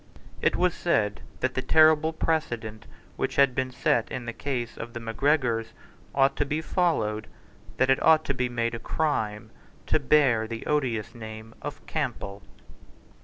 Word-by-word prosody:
It - - +2
was 180 -1 +2
said 105 -12 0 0.2
that 130 0 0
the 130 - -1
terrible 155 +2 +5
precedent 120 -10 -2 0.3
which 135 - -2
had 140 -2 +5
been 130 +1 -1
set 120 -2 +1
in 130 -2 -4
the 115 - -4
case 125 -4 -3
of 115 +1 -7
the 120 - -5
Macgregors 115 -1 0 0.4
ought 135 0 +4
to - - +2
be 150 +2 -2
followed, 155 - 0
and - - -24
that 130 +1 +3
it 135 - +2
ought 160 -1 +5
to 140 - 0
be 125 -2 -1
made 115 -1 -1
a 115 - -4
crime 110 -8 -2 0.3
to - - +2
bear 130 -6 +3
the 115 0 -6
odious 120 -8 -1
name 110 -1 -9
of 145 - -7
Campbell. 120 -9 -3
125 Hz, 170 wpm, -27 LUFS, 115-150 Hz, 0.4 s, terrible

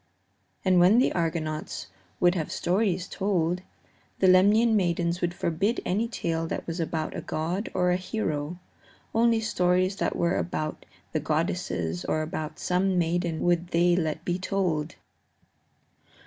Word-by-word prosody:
And 185 -1 +5
when 185 +6 +6
the 255 - +3
Argonauts 160 -2 -2 0.3
would 175 0 +4
have 165 -5 -3
stories 185 -1 0
told, 180 -3 0 0.6
the 190 - +3
Lemnian 205 +5 +5
maidens 175 -2 0
would 175 0 -1
forbid 195 +9 0
any 215 +5 0
tale 165 -7 -2
that - - -4
was 165 +1 -4
about 160 -1 -2
a - - -3
god 175 +7 -3
or 180 0 +2
a 180 - +2
hero; 175 -5 -3 0.6
only 230 0 +3
stories 185 -2 +1
that - - -1
were 170 +1 +1
about 155 -3 -3 0.2
the 155 - 0
goddesses 145 - -1
or 155 - 0
about 155 0 -5
some 185 +1 +1
maiden 170 -1 0
would 175 0 +2
they 175 0 +3
let 160 -2 -2
be 175 +1 -1
told. 175 -5 -1
175 Hz, 145 wpm, -27 LUFS, 160-185 Hz, 0.6 s, when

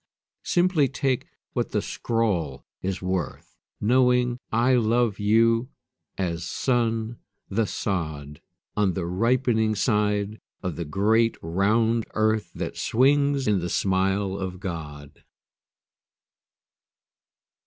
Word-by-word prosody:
Simply 175 -5 +3
take 130 -1 -1 0.3
what - - -2
the - - +1
scrawl 90 - -1 0.2
is 95 0 -3
worth 90 -1 -3 0.2
Knowing 125 +1 +3
I 120 +3 +3
love 115 -2 +2
you 115 +4 +3 0.5
as 85 -3 -2
sun 115 +1 -1 0.3
the 105 +2 0
sod 75 -7 -3 0.3
On 100 -3 +2
the 90 -2 -3
ripening 110 +3 +1
side 105 -1 0 0.2
of 90 -4 -2
the 85 - -4
great 110 +9 +2
round 110 +7 +1
earth 110 -4 +1
That - - -4
swings 140 +2 +2
in 105 -2 +3
the 85 0 -3
smile 95 +1 0
of 90 -1 -5
God. 75 -6 -7
105 Hz, 105 wpm, -25 LUFS, 95-120 Hz, 0.5 s, Simply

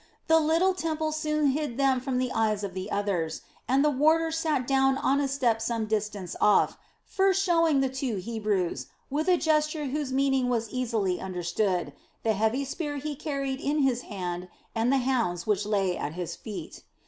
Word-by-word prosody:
The 320 0 +5
little 330 +5 +3
temple 315 -3 -2
soon 305 -1 +1
hid 290 -4 -3
them 270 -2 +3
from 255 0 -2
the 255 0 0
eyes 215 -2 0
of 195 -2 -4
the 185 0 -5
others, 185 -6 -1 0.3
and 270 +3 +3
the 300 - +4
warder 320 +4 +3
sat 315 -5 0
down 270 0 +3
on 275 +1 +2
a 280 - +1
step 250 -5 +1
some 230 -1 -1
distance 210 -4 -3
off, 210 - +4 0.3
first 390 0 +2
showing 330 -6 +3
the 270 - +2
two 260 -3 -2
Hebrews, 205 -3 -2 0.2
with 305 +4 -1
a 360 -1 +5
gesture 305 -1 +1
whose 280 0 -2
meaning 270 -1 +2
was 230 -3 -1
easily 225 -8 -1
understood, 180 -2 -1 0.3
the 225 - +2
heavy 220 +6 0
spear 290 +1 -4
he 295 +1 -4
carried 275 -2 -3
in 290 0 +1
his 250 -2 +2
hand 180 -4 -5 0.2
and 230 +2 +1
the 275 - +4
hounds 230 -10 0
which 210 -1 0
lay 195 -4 +1
at 150 - -4
his 175 -1 -4
feet. 210 -4 -8
260 Hz, 185 wpm, -27 LUFS, 210-300 Hz, 0.3 s, The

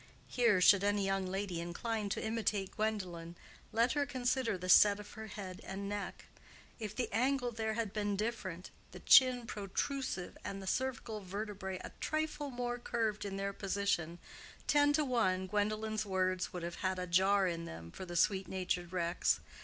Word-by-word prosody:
(Here 235 -6 +3
should 200 +1 +7
any 205 -1 +2
young 195 -1 0
lady 190 -2 -2
incline 210 +5 -3
to - - -2
imitate 215 -3 -1
Gwendolen, 180 -6 -2 0.4
let 230 +2 +3
her 290 -1 +1
consider 250 -4 0
the 180 0 -6
set 205 +2 +7
of 210 0 -10
her 220 0 -8
head 190 -3 -7
and 195 +1 -5
neck: 205 0 -5 0.5
if 215 -2 -5
the 245 - 0
angle 250 +2 +1
there 220 -1 -2
had 220 -3 -2
been 205 -1 0
different, 200 -4 -3 0.2
the - - -8
chin 255 -2 +6
protrusive, 210 0 -3
and 195 - -4
the 195 - -8
cervical 235 -1 -2
vertebrae 195 -1 -5
a - - -7
trifle 310 -2 -2
more 245 -1 -3
curved 220 -3 -1
in 195 -1 -4
their 200 0 -2
position, 195 -4 -1 0.5
ten 290 -1 +4
to 300 0 +2
one 190 -8 +1
Gwendolen's 215 +2 0
words 185 -2 0
would 180 -2 -5
have 170 0 -4
had 185 -1 -1
a 180 - -2
jar 190 +2 +4
in 170 -1 -3
them 85 - -8
for - - -8
the 175 -1 -7
sweet 190 +2 +2
natured 180 -2 -2
Rex. 175 -1 +1
205 Hz, 175 wpm, -34 LUFS, 185-230 Hz, 0.5 s, should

